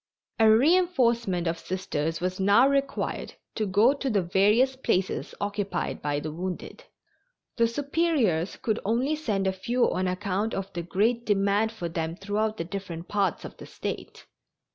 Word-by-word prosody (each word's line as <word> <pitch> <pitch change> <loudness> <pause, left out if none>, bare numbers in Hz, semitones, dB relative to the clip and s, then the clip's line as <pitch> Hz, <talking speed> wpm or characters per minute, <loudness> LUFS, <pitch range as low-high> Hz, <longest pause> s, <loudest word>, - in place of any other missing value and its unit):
A 220 -1 +6
reinforcement 235 - +3
of 165 0 -1
Sisters 165 -3 -3
was 185 +1 -2
now 200 +7 +5
required 275 0 -1 0.2
to 215 -2 -1
go 210 +7 +4
to 280 -1 -3
the 205 -5 +1
various 210 +9 +3
places 190 -7 -1
occupied 200 -3 -3
by 145 0 -1
the 155 +1 -5
wounded. 180 +3 -6 0.7
The 230 -1 +4
Superiors 270 - 0
could 220 -1 -1
only 245 +8 +1
send 215 -11 -1
a 190 - +1
few 235 +7 0
on 185 +1 0
account 195 +3 -1
of 195 0 -5
the 175 - -3
great 215 +8 0
demand 205 +1 +2
for 210 -7 -5
them 165 0 -3
throughout 210 +3 -2
the - - -2
different 175 -2 -6
parts 200 -4 0
of - - -9
the - - -11
State. - - -6
200 Hz, 160 wpm, -27 LUFS, 185-235 Hz, 0.7 s, A